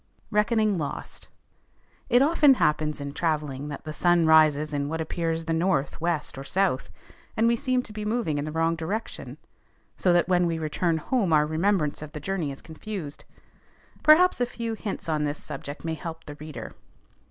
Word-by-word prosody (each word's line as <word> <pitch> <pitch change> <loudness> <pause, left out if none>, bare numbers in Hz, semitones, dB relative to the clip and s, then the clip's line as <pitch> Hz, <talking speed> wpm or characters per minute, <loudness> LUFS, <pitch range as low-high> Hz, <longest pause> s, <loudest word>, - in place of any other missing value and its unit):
RECKONING 210 -2 +2
LOST. 145 - -6 0.8
It 245 +2 +5
often 295 -2 +5
happens 150 -6 +1
in 140 0 -5
travelling, 150 -4 -2
that 145 -1 -7
the 155 - -6
sun 175 +1 +3
rises 155 -1 +4
in 145 0 -1
what 160 +1 -3
appears 165 0 -2
the 165 - -1
north, 160 -4 0
west, 165 -4 -2
or - - -6
south, 180 -3 0 0.5
and 225 +1 +4
we 235 - +4
seem 255 -1 0
to 210 - -9
be 215 0 -5
moving 210 -9 -1
in 145 - -2
the 155 - -4
wrong 165 +1 +1
direction, 185 +8 -5 0.6
so 180 - +3
that 175 0 +3
when 180 -1 +3
we 165 -1 -1
return 160 +2 0
home 195 - 0
our 150 -1 +5
remembrance 160 -1 0
of 155 -1 -8
the 150 - -5
journey 165 -2 -2
is 135 - -10
confused. 160 -2 -7 0.8
Perhaps 310 -1 +6
a 245 - +2
few 230 -1 -4
hints 210 -5 -5
on 155 -2 0
this 145 0 -1
subject 145 +1 -7
may 165 - -1
help 160 +1 -7
the 145 - -7
reader. 150 +1 -8
165 Hz, 185 wpm, -26 LUFS, 150-205 Hz, 0.8 s, Perhaps